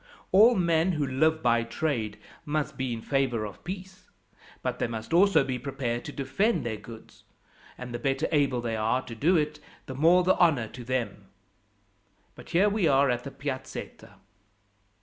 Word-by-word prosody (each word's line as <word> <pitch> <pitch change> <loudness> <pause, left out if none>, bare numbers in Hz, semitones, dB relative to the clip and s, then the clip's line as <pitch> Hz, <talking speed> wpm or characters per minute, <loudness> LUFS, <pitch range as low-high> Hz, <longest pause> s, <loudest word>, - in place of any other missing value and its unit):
All 225 +5 +7
men 170 0 +2
who 150 -3 0
live 155 +4 +1
by 120 -1 +3
trade 115 -4 -2 0.3
must 150 -1 -2
be 130 -2 -3
in 115 -1 -5
favour 130 -6 0
of 100 - -10
peace; 185 +1 -8 0.5
but - - -2
they - - 0
must 115 +5 -6
also 180 -3 +5
be 130 -2 -3
prepared 125 -2 -3
to - - -5
defend 160 - 0
their 115 -2 -2
goods, 110 +1 -13 0.5
and 125 -1 -7
the 120 - -3
better 135 +2 0
able 140 -5 +2
they 115 -1 -2
are 115 +4 0
to 120 - -9
do 165 +10 +2
it, 150 0 -1 0.3
the 130 - -7
more 165 +7 +4
the 185 - +3
honour 145 -10 +3
to 125 - -9
them. 125 -1 -3 1.1
"But - - -14
here 185 +5 +3
we 205 -4 +1
are 135 -1 +4
at 120 +1 -3
the - - -4
Piazzetta." 130 -2 -7
135 Hz, 175 wpm, -27 LUFS, 120-165 Hz, 1.1 s, All